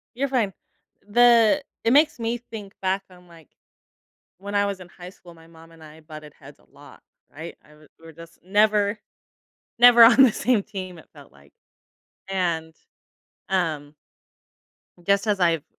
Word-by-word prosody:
You're 275 +2 -2
fine, 230 -7 -1 0.6
the 240 +4 +4 0.2
it 230 - +2
makes 300 -1 +3
me 230 +1 -3
think 220 -4 -11
back 190 +1 -1
on, 180 0 -19
like, 165 -3 -19 0.9
when 200 +1 -7
I 200 0 +2
was 200 -2 -4
in 180 - -12
high 180 0 -12
school, 175 -3 -17
my 165 0 -19
mom 165 0 -18
and 165 -1 -17
I 155 +1 -15
butted 155 -1 -13
heads - - -16
a - - -27
lot, - - -17 0.3
right? 160 +3 -10
I 150 - -22
wa 155 0 -21
we 165 - -19
were 160 - -13
just 165 +1 -15
never 210 +1 +1 0.8
never 240 -1 +8
on 245 +4 +7
the 245 - +5
same 230 -4 0
team, 185 -4 -9
it - - -17
felt 70 - -17
like, 70 0 -23 0.8
and, 170 -4 -3 0.7
um 155 -6 -3 1.1
just 200 +1 +1
as 205 -3 -1
I've 165 -4 +1
190 Hz, 165 wpm, -23 LUFS, 165-220 Hz, 1.1 s, never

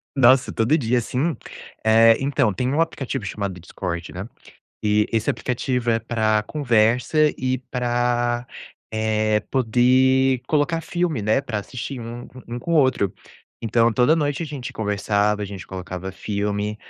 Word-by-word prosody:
Nossa, 130 0 +5
todo 115 +8 +2
dia, 125 -3 +1
sim. 135 +7 -1 0.5
Eh, 115 +1 +6
então 135 -5 +1
tem 125 +6 -1
um 155 - +1
aplicativo 135 -7 -3
chamado 100 -2 -4
Discord, 85 -1 -5
né? 95 +6 -6 0.5
E, 105 0 +2
esse 110 0 +1
aplicativo 125 -1 -2
é 115 - +2
pra 110 -2 +1
conversa 125 +3 +2
e 130 0 0
pra, 120 -1 0 0.5
eh, 110 -1 +1
poder 130 +1 +3
colocar 160 +2 +1
filme, 165 - -2
né? 110 +5 +2
Pra 120 -6 -4
assistir 125 +4 -6
um 120 +1 -7 0.2
um 120 - -4
com 170 +8 -4
o - - +4
outro. 130 -9 +2 0.5
Então, 115 +1 +2
toda 125 +8 +3
noite 145 +1 -1
a - - -4
gente 130 -4 -6
conversava, 105 -1 0
a - - -1
gente 95 -2 -8
colocava 95 0 -6
filme, 105 +1 -2
120 Hz, 150 wpm, -22 LUFS, 105-130 Hz, 0.5 s, Eh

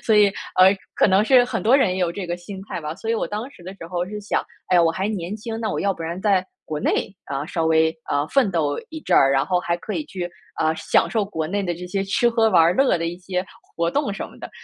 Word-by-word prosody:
所 220 -2 +3
以， 205 -1 +7 0.3
呃， 190 +2 +7 0.2
可 - - +4
能 195 +1 +4
是 250 +2 +5
很 245 - -3
多 235 +5 +5
人 265 - +3
也 - - -3
有 175 -2 +1
这 185 +1 -5
个 175 - -2
心 190 +2 -9
态 185 - -5
吧。 150 +1 -5
所 220 +5 -5
以 - - +2
我 225 - -1
当 215 +5 -4
时 180 - -17
的 185 +2 -8
时 165 - -10
候 175 0 -2
是 210 +2 -6
想： 210 - 0 0.3
“哎， 175 - +6
我 165 -1 +4
还 190 +4 -2
年 200 -1 -3
轻， 225 +1 -5
那 220 - -1
我 - - -2
要 200 -1 +1
不 165 - -8
然 170 +2 -4
在 190 -2 +2 0.2
国 150 -1 -4
内， 195 - 0
啊， 140 0 -3
稍 160 +1 -1
微， 160 0 +3 0.2
呃， 145 +1 +1
奋 265 -7 +3
斗 150 -5 0
一 315 0 -7
阵 - - +1
儿， 135 - +6
然 135 0 +2
后 180 -1 +1
还 170 -1 -1
可 210 +4 -6
以 - - -2
去， 180 -6 -5 0.3
呃， 160 0 +2
享 - - +2
受 220 -3 0
国 160 -6 -3
内 200 +4 -1
的 175 -2 -2
这 180 +2 -8
些 195 +2 -1
吃 195 +5 +2
喝 225 -1 +3
玩 180 -5 +5
儿 170 +2 +4
乐 270 -3 +3
的 165 - -2
一 175 +1 -4
些 180 0 -3 0.3
活 170 0 +1
动 280 - 0
什 - - -5
么 - - -16
的。” - - -8
185 Hz, 305 characters per minute, -22 LUFS, 170-210 Hz, 0.3 s, 以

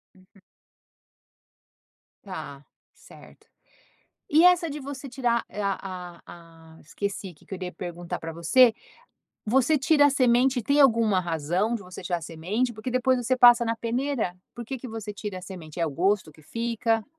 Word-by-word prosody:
Uhum. 185 +1 -23 1.8
Tá, 150 -8 -8 0.3
certo. - - -17 0.8
E 315 +3 +5
essa 355 -2 +5
de 290 - -5
você 275 0 -7
tirar 240 -2 0
e - - -14
a 200 -1 -1
a 180 -2 -8 0.6
a - - -18
esqueci 195 +2 -5
que - - -23
eu 190 - -4
iria 180 -1 -6
perguntar 175 -1 -6
para 165 0 -6
você. 220 +9 +4 0.7
Você 265 +7 +3
tira 290 +1 +4
a - - +6
semente, 255 -1 +3
tem 280 +6 +2
alguma 230 -7 +4
razão 175 +6 -1
de 225 - -6
você 180 -1 -10
tirar 175 -1 -2
a - - -19
semente? 180 +10 -2
Porque 215 +2 -6
depois 255 +1 +2
você 250 +1 0
passa 240 -1 +7
na 230 0 0
peneira. 235 -4 -2 0.2
Por 240 - -6
que 265 +3 -5
que 255 - -9
você 220 -2 -6
tira 205 -2 -6
a - - -14
semente? 175 -4 -9
É - - +3
o - - -2
gosto 185 +2 0
que 155 - -20
fica? 230 +4 -1
220 Hz, 170 wpm, -26 LUFS, 180-255 Hz, 1.8 s, passa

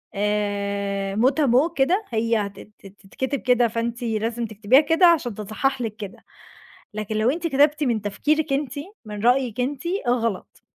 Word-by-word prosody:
آآ 200 -1 -1
Mot 245 +5 +4
à - - +4
mot 275 +8 +3
كده. 360 +10 +1
هي 230 0 +1
هتت 200 0 -5
تتكتب 200 +8 -5
كده، 245 -1 +3
فأنتِ 235 +2 -3
لازم 230 +1 -2
تكتبيها 220 +6 +3
كده، 325 +4 +3
عشان 290 -9 +2
تتصحح 230 +6 -2
لِك 220 -2 -3
كده. 205 -4 -9 0.7
لكن 215 0 -4
لو 220 +3 +2
أنتِ 335 +2 -2
كتبتِ 295 +1 +3
من 235 -6 0
تفكيرِك 290 +9 0
أنتِ، 275 -2 -1 0.3
من 210 0 -7
رأيِِك 250 -2 +2
أنتِ، 270 +2 -3 0.2
غلط. 230 -5 -2
230 Hz, 155 wpm, -23 LUFS, 210-270 Hz, 0.7 s, Mot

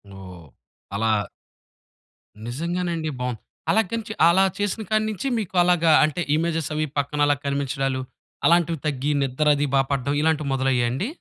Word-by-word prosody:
ఓహ్! 95 -3 -11 0.5
అలా 110 +3 0 1.4
నిజంగానండి. 170 +4 -2
బాం 125 -1 -2 0.3
అలా 220 - +4
గానీ 230 -1 -3
చే 220 - -4
అలా 180 +3 +5
చేసిన 205 +2 -2
కాడ 215 0 +2
నించి 215 +3 -4
మీకు 190 -3 -6
అలాగా 175 -2 +3
అంటే 155 +3 0
ఇమేజెస్ 165 -1 -1
అవి 155 0 0
పక్కన 145 +1 -1
అలా 145 0 +3
కనిపించడాలు. 135 -1 -1 0.4
అలాంటివి 170 -2 +3
తగ్గి 145 0 -1
నిద్రది 145 +2 +2
బా 135 - +5
పడ్డం 140 0 0
ఇలాంటివి 155 -2 +1
మొదలయ్యాయండి? 130 - 0
150 Hz, 140 wpm, -23 LUFS, 135-170 Hz, 1.4 s, అలా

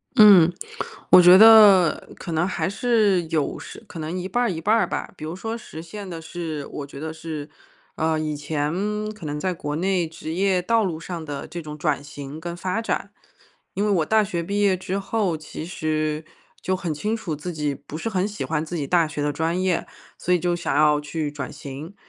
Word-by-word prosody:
嗯， 195 -6 +8 0.6
我 180 - +10
觉 180 +1 +9
得 210 -6 +7
可 170 - -7
能 160 +3 +1
还 190 - -1
是 210 -3 +2
有 155 -4 0
时 - - -10
可 180 -5 -9
能 160 +4 -4
一 180 - -3
半 245 +5 0
儿 235 - +1
一 165 - -4
半 210 +7 +3
儿 230 - +2
吧。 - - -4
比 155 - -11
如 160 +3 -4
说 225 +4 -4
实 160 -8 -9
现 200 +3 -8
的 170 -2 -6
是 155 -2 -5
我 145 - -6
觉 140 - -10
得 160 +1 -5
是， 160 -2 -6 0.5
呃， 160 0 0
以 155 -1 -2
前 150 +1 -2 0.4
可 210 -6 -11
能 150 0 -3
在 185 +3 -1
国 150 -3 -4
内 180 0 0
职 160 0 -7
业 185 0 +2
道 230 +3 +2
路 170 -5 -2
上 170 -1 -6
的 145 -2 -6
这 170 0 -6
种 150 -1 -8
转 150 -2 0
型 145 +1 -8
跟 170 +1 -5
发 185 +5 -2
展。 - - -2 0.6
因 205 +2 0
为 210 - +2
我 170 -6 +2
大 220 +2 +3
学 175 -3 -2
毕 200 +4 -2
业 200 -2 +4
之 185 +2 -3
后 195 -5 -1
其 155 0 -8
实 155 -2 -2 0.4
就 185 - 0
很 175 -4 -3
清 210 +9 -2
楚 195 -8 -4
自 175 +4 -6
己 150 -2 -1
不 150 - -9
是 225 - -3
很 190 -2 0
喜 210 -1 -5
欢 160 -1 -1
自 175 - -6
己 150 -4 -2
大 170 -2 +3
学 150 -1 -5
的 145 0 +1
专 165 +5 -1
业， 185 -2 0 0.3
所 180 - 0
以 180 - +3
就 175 0 0
想 175 -5 -2
要 150 0 +4
去 150 0 -3
转 145 -3 -6
型。 145 +7 -8
170 Hz, 240 characters per minute, -23 LUFS, 155-190 Hz, 0.6 s, 我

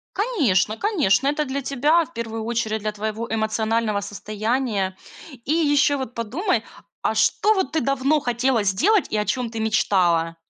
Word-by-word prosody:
Конечно 280 - +1
конечно, 290 - +2
это 295 +1 0
для 275 +1 -3
тебя, 290 +6 +2
в 335 - -22
1 225 -1 -4
очередь, 225 -1 -1
для 215 0 -2
твоего 220 +2 -4
эмоционального 220 -1 0
состояния. 210 -1 -2 0.5
И 295 - -1
ещё 290 -3 +3
вот 250 -2 -5
подумай, 235 - -1 0.4
а - - +1
что 430 +1 +3
вот 380 -9 -1
ты 320 - +2
давно 275 +3 +1
хотела 245 -3 0
сделать 335 - +2
и 215 - 0
о 210 - 0
чём 235 +3 -1
ты 225 - -5
мечтала? 175 -6 +1
230 Hz, 160 wpm, -22 LUFS, 215-285 Hz, 0.5 s, ещё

